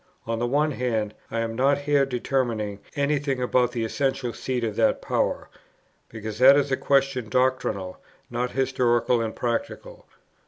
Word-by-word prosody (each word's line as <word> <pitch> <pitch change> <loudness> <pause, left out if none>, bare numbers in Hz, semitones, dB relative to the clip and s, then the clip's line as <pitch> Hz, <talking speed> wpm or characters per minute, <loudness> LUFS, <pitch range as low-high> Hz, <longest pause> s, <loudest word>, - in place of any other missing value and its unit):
on 115 0 -2
the 120 - 0
one 150 +4 +1
hand, 115 -5 -1 0.2
I 115 - -2
am 115 0 -3
not 135 +3 +3
here 145 -1 +2
determining 120 -5 -1 0.2
any 145 0 +1
thing 135 -2 -2
about 125 -1 +2
the 120 -2 -2
essential 135 0 -1
seat 125 +2 -3
of 110 -3 -2
that - - +3
power, - - -1 0.6
because 110 -1 -7
that 135 +2 +8
is 140 -1 +1
a - - +3
question 135 -4 +1
doctrinal, 125 -7 0 0.3
not 120 +1 -3
historical 125 -2 +1
and 110 -1 -3
practical; 120 -1 -4
2. - - -30
125 Hz, 165 wpm, -25 LUFS, 115-135 Hz, 0.6 s, that